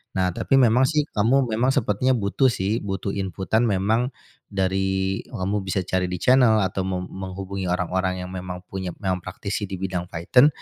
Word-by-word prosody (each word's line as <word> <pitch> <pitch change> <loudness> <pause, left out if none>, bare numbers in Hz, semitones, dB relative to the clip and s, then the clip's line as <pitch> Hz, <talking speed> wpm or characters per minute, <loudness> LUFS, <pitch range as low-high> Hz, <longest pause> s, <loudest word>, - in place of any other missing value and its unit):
Nah, 95 -1 +1
tapi 135 - 0
memang, 130 0 +5
sih, 150 0 +2
kamu 120 +6 +3
memang 125 +5 +2
sepertinya 115 +5 +2
butuh, 110 +5 +2
sih, 110 -2 0
butuh 95 0 -3
inputan 95 +4 0
memang 110 +6 +1 0.3
dari 95 0 0
kamu 105 -3 -2
bisa 95 -1 -2
cari 90 0 0
di 90 - -3
channel 115 0 +4
atau 95 0 -1
meng 90 -1 -3
menghubungi 95 0 -5
orang-orang 90 +1 -1
yang 90 - -7
memang 90 -1 -6
punya 95 -1 -5
memang 95 -1 0
praktisi 100 +3 -4
di 95 - -5
bidang 90 -1 -3
Python, 90 - +4
95 Hz, 170 wpm, -24 LUFS, 95-110 Hz, 0.3 s, memang